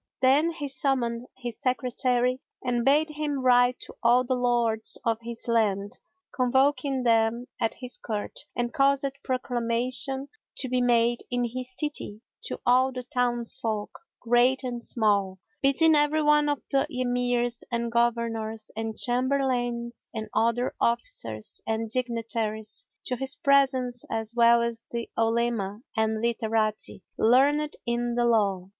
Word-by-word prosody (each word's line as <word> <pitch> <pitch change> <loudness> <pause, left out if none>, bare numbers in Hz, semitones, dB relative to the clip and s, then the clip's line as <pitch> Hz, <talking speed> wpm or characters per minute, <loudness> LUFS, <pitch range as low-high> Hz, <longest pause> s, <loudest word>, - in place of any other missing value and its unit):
Then 275 +5 +4
he 320 -4 -4
summoned 255 -3 0
his 240 -3 -6
Secretary 250 0 0 0.2
and 240 -1 0
bade 295 +4 +4
him 295 -1 -2
write 245 0 +4
to - - -8
all 240 +2 +4
the 255 +1 -1
Lords 240 -3 +1
of 225 -1 +1
his 235 +1 -6
land, 205 -4 0 0.3
convoking 265 +1 +1
them 230 0 +2
at 225 -2 0
his 250 -1 -5
Court, 215 -3 -5 0.2
and 240 0 -2
caused 275 0 +2 0.2
proclamation 255 +2 -1 0.3
to 260 - 0
be 250 0 +1
made 240 -1 +2
in 245 0 0
his 255 +2 -5
city 295 -8 -2 0.3
to - - -4
all 255 +1 +4
the 250 -1 -6
townsfolk 240 -3 -1 0.3
great 245 +3 +3
and 240 -2 -4
small, 200 -4 +1 0.2
bidding 315 +4 +5
every 300 +1 +2
one 295 0 +4
of 290 -2 -2
the 275 -1 +2
Emirs 245 -1 -1
and 235 0 -1
Governors 230 -2 -1
and 225 0 -4
Chamberlains 245 -2 0
and 220 -1 -4
other 235 +2 +1
officers 115 - -2
and 220 0 -2
dignitaries 230 -3 -2 0.2
to 250 - -2
his 270 +2 0
presence 265 -4 +2
as 225 0 -2
well 235 0 +5
as 235 -1 -3
the 235 -1 -5
Olema 225 -3 0
and 220 0 0
Literati 220 -3 -1 0.2
learned 285 +6 +3
in 240 0 -1
the 240 0 +2
law. 200 -5 +1
240 Hz, 140 wpm, -26 LUFS, 230-255 Hz, 0.3 s, bidding